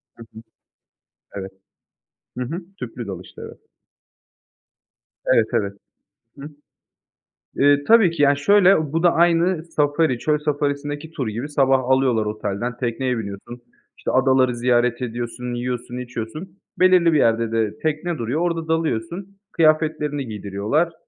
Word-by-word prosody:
Hı 115 - -12
hı. 110 - -11 0.9
Evet. 95 -1 -6 0.9
Hı 125 - -1
hı. 170 +8 -5
Tüplü 120 -1 -6
dalıştı, 95 -2 -9
evet. - - -13 1.7
Evet, - - +3
evet. 100 -1 0 0.6
Hıı. 145 +2 -8 1.1
Eee, 145 0 +4
tabii 220 -7 +6
ki 165 - -3
ya, 140 0 +5
şöyle, 185 -1 +4
bu 165 +1 0
da 175 - +5
aynı 170 0 +2
Safari, 150 -4 +1
çöl 150 +2 +1
Safari'sindeki 145 +1 -3
tur 135 -7 -4
gibi 115 +7 -4
sabah 135 -2 +2
alıyorlar 130 -4 +2
otelden, 105 +3 -3
tekneye 125 +1 -2
biniyorsun, 110 +3 -7 0.4
işte, - - -3
adaları 130 -1 +3
ziyaret 120 0 +1
ediyorsun, 120 +1 -4
yiyorsun, 125 0 -4
içiyorsun, 125 - -7 0.2
belirli 180 -2 +5
bir - - +4
yerde 115 -3 +2
de 110 -2 -1
tekne 160 +2 -2
duruyor, 125 +7 -2
orada 165 -2 -1
dalıyorsun, 165 - -2
kıyafetlerini 155 -3 +1
giydiriyorlar. 105 - -1
135 Hz, 130 wpm, -21 LUFS, 120-160 Hz, 1.7 s, tabii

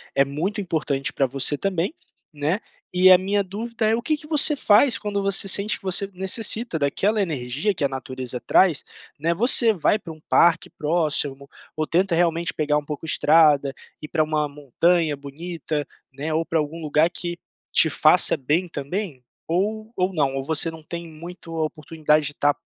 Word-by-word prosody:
é 140 - +5
muito 180 +10 -3
importante 150 -6 -2
pra 135 - +1
você 135 +3 0
também, 190 - -2 0.4
né. 150 +7 -1 0.3
E 185 +1 +6
a 180 - +9
minha 200 +2 0
dúvida 220 +3 -3
é: 220 - +3
O 235 - -3
que 310 +5 0
que 300 - -11
você 300 -1 +3
faz 230 +1 +4
quando 205 -1 -3
você 195 0 +2
sente 200 +2 +1
que - - -27
você 190 +1 -1
necessita 195 +1 -1
daquela 200 +9 0
energia 145 - -1
que 160 -5 -4
a 140 - 0
natureza 130 -1 -5
traz, 170 +5 +3 0.4
né. 165 +3 +1
Você 235 +1 +4
vai 195 +2 +1
para 165 - -9
um 155 - -18
parque 170 -1 +3
próximo? 150 -3 -1 0.3
Ou 155 0 -2
tenta 185 +2 +1
realmente 170 0 0
pegar 150 -1 0
um 150 - -4
pouco 150 +2 -6
estrada 150 -3 +3 0.3
e - - -6
ir - - -33
para 160 -2 +1
uma 155 -1 -1
montanha 150 +2 0
bonita, 150 +1 -5 0.3
né? 150 +4 -4
Ou 165 +1 0
para 165 -1 0
algum 150 +2 -4
lugar 155 +2 +2
que 175 0 -5 0.4
te - - +6
faça - - +4
bem 155 +7 0
também? 150 -1 -5 0.3
Ou 215 +6 -2
ou 185 +1 0
não, 140 -5 0
ou 135 - -3
você 160 +2 0
não 160 -1 -11
tem 170 +1 -7
muito 165 +1 -10
a 160 - 0
oportunidade 155 0 0
de - - -2
estar 145 0 +1
165 Hz, 190 wpm, -23 LUFS, 145-190 Hz, 0.4 s, a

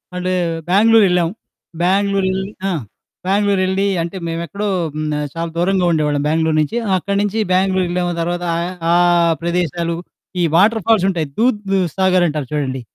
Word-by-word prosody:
And 180 0 -2 0.4
Bengaluru 220 +3 +5
ఎళ్ళాం, 175 -2 +2 0.5
బెంగుళూరెళ్ళి 190 +1 +1 0.2
ఆ! - - 0 0.6
బెంగుళూరెళ్ళి 195 -1 +1 0.2
అంటే 170 +3 -4
మేము 165 0 -3
ఎక్కడో 205 +4 -4 0.3
హ్మ్. 155 0 -3
ఆహ్, 150 0 -2
చాలా 165 0 -3
దూరంగా 180 +1 +1
ఉండేవాళ్ళం 150 -2 0
బెంగుళూరు 160 0 +1
నుంచి. 220 +11 -2 0.2
అక్కడి 200 +2 -2
నుంచి 205 +2 -1
బెంగుళూర్ 185 0 +2
ఎళ్ళాము 175 0 -1
తర్వాత 175 +1 -2
ఆహ్, 175 +2 -3 0.2
ఆ - - +4 0.5
ప్రదేశాలు 170 -1 -1 0.5
ఈ - - +3
వాటర్ 215 +5 +4
ఫాల్సుంటాయి. 190 -8 +2
దూద్ 225 -3 +2 0.4
సాగర్ 185 -2 +3
అంటారు 150 -4 -3
చూడండి. 130 -3 -2
180 Hz, 145 wpm, -18 LUFS, 165-195 Hz, 0.6 s, బెంగుళూర్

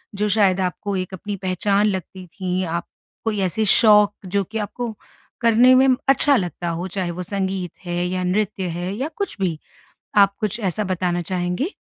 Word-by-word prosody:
जो 210 +1 0
शायद 195 -2 +3
आपको 190 +2 -2
एक 185 0 -4
अपनी 205 +3 -5
पहचान 195 +3 +1
लगती 190 -1 -4
थीं? 185 +1 -3
आप 170 +1 -3 0.4
कोई 215 -2 0
ऐसे 190 +4 0
शौक 210 -1 +6
जो 200 +2 0
कि 220 +5 -6
आपको 225 +3 -4 0.5
करने 235 +2 +6
में 265 +1 +5 0.2
अच्छा 280 +1 +5
लगता 175 - -2
हो, 170 +2 -3
चाहे 180 -1 -3
वो 180 +2 -5
संगीत 190 -2 -3
है 175 0 -1
या 185 0 -2
नृत्य 195 +1 -1
है 180 +2 -3
या 265 +6 -2
कुछ 400 - -3
भी, 175 -4 -1 0.6
आप 200 -1 +5
कुछ 215 +2 -2
ऐसा 200 +1 -1
बताना 180 -1 -1
चाहेंगी? 180 - -2
190 Hz, 175 wpm, -21 LUFS, 180-210 Hz, 0.6 s, शौक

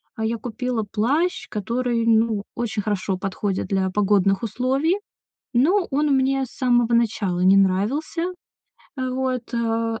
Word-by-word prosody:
А 220 - -4
я 230 +1 -1
купила 240 +1 -3
плащ, 285 +12 0
который, 230 +2 -1
ну, 225 -2 +2
очень 220 -3 -2
хорошо 195 -2 -1
подходит 195 +1 -2
для 190 -1 0
погодных 195 0 +2
условий, 265 - 0 0.6
но 350 +10 +3
он 295 +3 +1
мне 265 0 +1
с - - -19
самого 240 -3 +2
начала 210 -6 0
не 190 +2 +6
нравился, 205 - +1 0.7
э, 260 0 -2
вот, 255 -1 -2
а. 230 -1 -1
230 Hz, 140 wpm, -23 LUFS, 205-255 Hz, 0.7 s, не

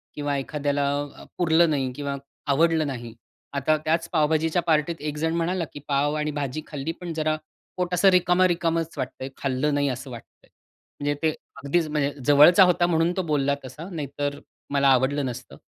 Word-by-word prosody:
किंवा 145 -1 -2
एखाद्याला 145 0 -1 0.3
अ, - - -12
पुरलं 170 -1 +4
नाही 135 -4 0
किंवा 140 0 -3 0.3
आवडलं 160 +2 +3
नाही. 120 -4 -6 0.4
आता 140 +2 +2
त्याच 165 +1 +1
पावभाजीच्या 160 +2 +2
पार्टीत 160 0 +1
एक 150 0 -4
जण 160 +2 0
म्हणाला, 170 +1 0
"की - - -7
पाव 145 +1 +1
आणि 150 0 -1
भाजी 145 0 -3
खाल्ली, 150 +1 -4
पण 170 0 -7
जरा 155 -1 0 0.4
पोट 180 0 -2
असं 185 +2 +5
रिकामा-रिकामाच 175 -2 +2
वाटतं 130 0 -5
आहे, 135 - -4
खाल्लं 140 +2 0
नाही 145 0 +1
असं 130 +1 -5
वाटतं 115 - -12
आहे". - - -38 0.5
म्हणजे 145 0 0
ते 160 - +4 0.3
अगदीच 155 +3 +1
म्हणजे 145 -2 0
जवळचा 150 +6 +7
होता 175 -1 +3
म्हणून 165 0 +2
तो 190 - +2
बोलला 140 -1 +2
तसा, 150 +7 -9
नाहीतर 145 -2 -4 0.3
मला 140 0 +3
आवडलं 135 +2 +3
नसतं. 125 0 -7
150 Hz, 175 wpm, -25 LUFS, 140-165 Hz, 0.5 s, जवळचा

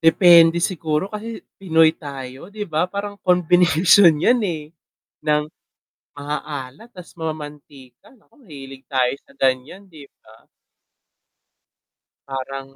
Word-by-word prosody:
Depende 170 0 +6
siguro 165 +1 -2
kasi 220 +2 -7 0.2
pinoy 160 -4 +4
tayo,, 140 -1 -9
'di 210 +1 -6
ba? 165 -1 -1
Parang 205 +1 -6
combination 180 +1 +4
'yan, 240 +11 +2
eh, 160 -6 -4 0.5
ng 150 -1 +1 0.7
maaaalat 145 - -7
tas 180 -5 -14
mamantika, 145 -5 -9
naku 255 +2 -26
mahilig 135 - -12
tayo 130 -2 +1
sa - - -23
ganyan 135 +9 -1
'di 155 -6 -14 0.2
ba? 110 +1 -21 1.8
Parang 135 0 -7
160 Hz, 110 wpm, -20 LUFS, 140-180 Hz, 1.8 s, Depende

